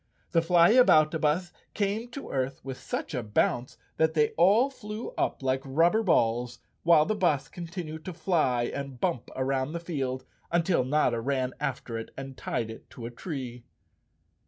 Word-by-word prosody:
The 165 - +4
Flyaboutabus 170 -3 +4 0.2
came 215 +3 -1
to 275 +3 -8
earth 130 0 -2
with 135 -1 -6
such - - -4
a 125 - -1
bounce 120 +3 0 0.2
that 160 0 +2
they 150 -1 +4
all 210 - +4
flew 215 -3 -6
up - - -1
like 130 0 +1
rubber 165 +10 +3
balls, 120 - +1 0.2
while 165 -2 +5
the 215 - 0
bus 165 -9 +1
continued 170 -2 -7
to 185 - -5
fly 160 -8 +1
and 140 +1 -5
bump 120 - -1
around 130 +2 -1
the 170 - -2
field 135 -6 -3 0.3
until 170 -4 +2
Notta 130 -3 +1
ran 130 0 -1
after 130 -5 -3
it 115 - -7
and 135 0 -7
tied 115 -2 -3
it 110 - -12
to 115 - -9
a 120 - -5
tree. 125 -4 -6
150 Hz, 160 wpm, -28 LUFS, 130-175 Hz, 0.3 s, while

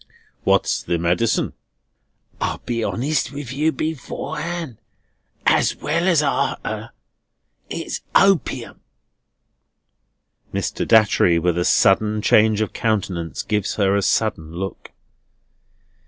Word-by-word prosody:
"What's - - +2
the 85 - -1
medicine?" 90 +7 0 0.9
"I'll - - -1
be 115 -2 -2
honest 145 +8 -1
with 140 -3 -6
you 155 +4 +1
beforehand, 155 0 -4 0.7
as - - +3
well 170 +4 -1
as 165 -5 +4
after. 140 - -2 0.8
It's - - -4
opium." 195 -4 +2 1.7
Mr. - - -2
Datchery, 105 -6 +4
with 85 0 +1
a 90 0 0
sudden 105 +2 +3
change 110 -1 +4
of 110 - -2
countenance, 95 - -2
gives 105 -2 -1
her 100 -2 +2
a 100 - +2
sudden 85 -7 0
look. 95 +2 -6
110 Hz, 105 wpm, -21 LUFS, 95-150 Hz, 1.7 s, as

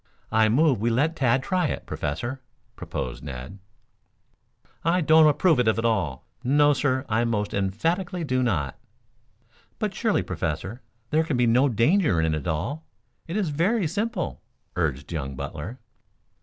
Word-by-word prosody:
"I 110 0 +4
move 135 +1 +3
we 115 - +2
let 145 +8 +1
Tad 130 -1 +2
try 180 -2 +1
it, - - -4
Professor," 80 - -4 0.3
proposed - - -5
Ned. 65 +8 -7 1.2
"I 170 +3 +3
don't 160 0 +6
approve 155 0 +3
of 125 - +2
it 110 - +3
at 115 - -1
all. 90 - 0 0.2
No, 145 +3 +4
sir, 130 0 0
I 110 +2 +1
most 110 -3 -1
emphatically 165 - -1
do 130 -4 0
not." 85 - -1 1.0
"But 210 -2 -2
surely, 220 +1 +1
Professor, 85 - -4 0.3
there 155 +1 +3
can 155 -5 -1
be 125 - +3
no 125 +5 +4
danger 130 - +3
in 80 -1 +1
it - - +1
at 75 - -8
all. 115 - -2 0.4
It 170 +5 -3
is 195 -6 0
very 180 +8 +1
simple," 200 +3 -2 0.3
urged 75 -4 -2
young 70 -5 -4
Butler. 75 - -6
125 Hz, 155 wpm, -25 LUFS, -, 1.2 s, don't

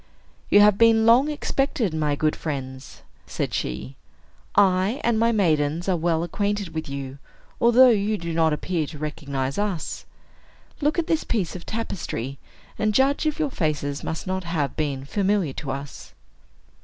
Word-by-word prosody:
"You 205 - +7
have 205 -1 +5
been 225 -1 +5
long 245 +6 +5
expected, 270 - -1
my 150 -2 0
good 155 +1 0
friends," 130 -4 -6 0.2
said - - -3
she. 65 +1 -4 0.6
"I 195 +5 +3
and 230 -2 +2
my 230 +1 +3
maidens 165 -5 +1
are 190 - +2
well 165 -1 0
acquainted 205 +2 -2
with 160 -2 -4
you, 140 0 -6 0.4
although 250 +2 +7
you 210 0 +1
do 170 -2 -5
not 160 -1 +3
appear 155 +1 -1
to 150 - -9
recognize 140 -1 -3
us. 195 -7 -3 0.7
Look 295 +3 +1
at 340 - +1
this 320 -1 0
piece 195 -8 -2
of 180 - -9
tapestry, 140 - -4 0.4
and 215 -1 +1
judge 280 +3 +3
if 305 - -1
your 305 -3 -1
faces 150 - -2
must 160 - -4
not 190 0 -2
have 160 -6 -2
been 140 -3 -2
familiar 195 -3 0
to 140 - -6
us." 140 +1 -7
175 Hz, 160 wpm, -24 LUFS, 145-215 Hz, 0.7 s, You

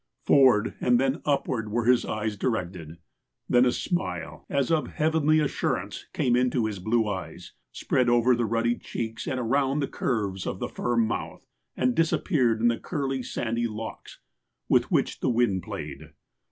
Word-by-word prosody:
Forward 130 -6 +5
and 125 -1 +3
then 135 +3 0
upward 130 -6 0
were 115 +2 -1
his 125 0 +4
eyes 110 0 -2
directed. 90 -8 -3 0.5
Then 125 +1 +4
a - - +3
smile, 175 +7 -3
as 140 0 0
of 160 -2 +1
heavenly 155 0 +2
assurance, 150 -3 -2
came 120 -1 +1
into 125 -1 +1
hia 105 -3 -3
blue 110 +2 +1
eyes, 95 -5 -6 0.2
spread 125 -1 0
over 120 +1 +4
the 120 -1 0
ruddy 115 +2 0
cheeks, 115 -1 -5
and 130 - -1
around 135 +4 +1
the 140 - 0
curves 100 -7 -2
of - - -3
the - - -4
firm 115 -2 0
mouth 110 - -4 0.3
and 125 -1 +2
disappeared 145 - +1
in 120 - +4
the 115 -1 +1
curly, 135 -5 -2
sandy 120 -1 -2
locks 110 0 -8 0.5
with - - +3
which - - 0
the - - 0
wind 115 -6 +2
played. - - -7
120 Hz, 165 wpm, -26 LUFS, 110-135 Hz, 0.5 s, Forward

